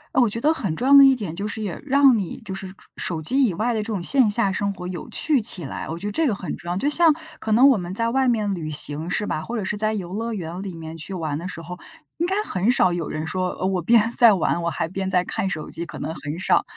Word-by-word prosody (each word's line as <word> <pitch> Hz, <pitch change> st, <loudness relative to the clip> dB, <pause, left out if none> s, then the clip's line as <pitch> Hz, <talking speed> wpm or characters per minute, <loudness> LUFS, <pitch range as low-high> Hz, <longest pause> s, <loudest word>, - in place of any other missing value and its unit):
哦， 260 Hz, -, +5 dB
我 235 Hz, -, +3 dB
觉 230 Hz, +3 st, -3 dB
得 305 Hz, +5 st, +3 dB
很 195 Hz, -, -3 dB
重 250 Hz, +10 st, -2 dB
要 280 Hz, -, +5 dB
的 280 Hz, -, +10 dB
一 270 Hz, -1 st, +6 dB
点 200 Hz, -9 st, -6 dB
就 200 Hz, +4 st, -4 dB
是 210 Hz, -, -5 dB
也 195 Hz, -4 st, -5 dB
让 280 Hz, -2 st, +5 dB
你 195 Hz, -6 st, -4 dB
就 190 Hz, -, -5 dB
是 190 Hz, 0 st, -6 dB
手 185 Hz, -, -11 dB, 0.4 s
手 160 Hz, -, -3 dB
机 265 Hz, -, +2 dB
以 200 Hz, -, 0 dB
外 235 Hz, +3 st, 0 dB
的 220 Hz, -, -1 dB
这 -, -, -6 dB
种 205 Hz, -5 st, -3 dB
线 260 Hz, +1 st, +4 dB
下 205 Hz, -2 st, +1 dB
生 200 Hz, +1 st, -1 dB
活 180 Hz, -2 st, -7 dB
有 180 Hz, -3 st, -7 dB
趣 295 Hz, -6 st, +2 dB
起 190 Hz, -4 st, +2 dB
来， 140 Hz, -, -6 dB
我 165 Hz, -, -4 dB
觉 195 Hz, +4 st, -4 dB
得 -, -, -3 dB
这 320 Hz, +9 st, +1 dB
个 225 Hz, -, 0 dB
很 190 Hz, -, -5 dB
重 175 Hz, -, -10 dB
要。 175 Hz, -, -1 dB
就 275 Hz, +9 st, -1 dB
像 325 Hz, +2 st, +5 dB, 0.3 s
可 220 Hz, -, -4 dB
能 245 Hz, +6 st, +6 dB
我 260 Hz, -, +4 dB
们 175 Hz, 0 st, -6 dB
在 230 Hz, +2 st, 0 dB
外 265 Hz, +2 st, +1 dB
面 215 Hz, -5 st, +1 dB
旅 160 Hz, -4 st, -5 dB
行， 150 Hz, +2 st, -1 dB
是 210 Hz, +3 st, -1 dB
吧？ 155 Hz, -, -2 dB
或 235 Hz, +8 st, -5 dB
者 205 Hz, -, -3 dB
是 200 Hz, -, -2 dB
在 215 Hz, +1 st, 0 dB
游 185 Hz, -4 st, -5 dB
乐 230 Hz, +3 st, -3 dB
园 175 Hz, -1 st, -6 dB
里 195 Hz, -3 st, -6 dB
面 160 Hz, 0 st, -8 dB
去 160 Hz, +4 st, -6 dB
玩 155 Hz, -4 st, -3 dB
的 175 Hz, -, -6 dB
时 170 Hz, -3 st, -7 dB
候， 180 Hz, +2 st, -8 dB, 0.4 s
应 340 Hz, -, 0 dB
该 380 Hz, -, 0 dB
很 200 Hz, -, +1 dB
少 185 Hz, -7 st, +2 dB
有 170 Hz, -3 st, -3 dB
人 155 Hz, +1 st, -4 dB
说， 185 Hz, +2 st, -2 dB
呃， -, -, -4 dB
我 190 Hz, -1 st, 0 dB
边 230 Hz, +5 st, +3 dB
在 230 Hz, -4 st, +8 dB
玩， 175 Hz, -1 st, 0 dB
我 170 Hz, -, -1 dB
还 165 Hz, -, -2 dB
边 190 Hz, +2 st, -4 dB
在 180 Hz, -1 st, +2 dB
看 190 Hz, -, -3 dB
手 155 Hz, -5 st, -5 dB
机， 170 Hz, -, -4 dB
可 -, -, -9 dB
能 160 Hz, -, -4 dB
很 150 Hz, 0 st, -6 dB
少， -, -, +2 dB
195 Hz, 325 characters per minute, -22 LUFS, 175-230 Hz, 0.4 s, 的